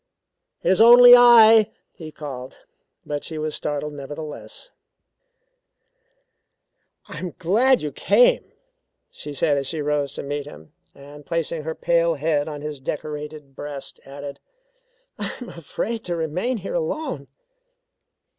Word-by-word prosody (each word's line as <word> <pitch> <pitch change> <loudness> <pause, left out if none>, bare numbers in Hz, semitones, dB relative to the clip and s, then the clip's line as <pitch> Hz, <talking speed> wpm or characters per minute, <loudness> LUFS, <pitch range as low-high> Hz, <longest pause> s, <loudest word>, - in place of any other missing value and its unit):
"It - - +2
is 190 - +3
only 245 +1 +10
I," 225 -3 +7 0.2
he 160 -4 -11
called, 130 -4 -9 0.4
but 145 -1 -4
she 160 - -5
was 155 0 -3
startled 150 0 -3
nevertheless. 150 - -8 2.4
"I - - -8
am 180 -2 -6
glad 230 +8 +2
you 150 - -3
came," - - +2 0.6
she 150 - -9
said 145 +1 +1
as 135 -1 -2
she 160 +2 -3
rose 145 -2 -1
to - - -6
meet 145 0 -4
him, 80 - -14 0.2
and 145 +1 -13
placing 165 0 -3
her 160 0 -4
pale 170 -1 +1
head 150 0 -1
on 150 -2 -6
his 150 -1 -6
decorated 150 0 -7
breast 145 -1 -7
added 140 0 -9 0.8
"I - - -3
am 245 - -9
afraid 220 +8 -5
to 175 - -2
remain 175 +10 -2
here 220 - -6
alone." 320 - -3
155 Hz, 135 wpm, -22 LUFS, 145-200 Hz, 2.4 s, only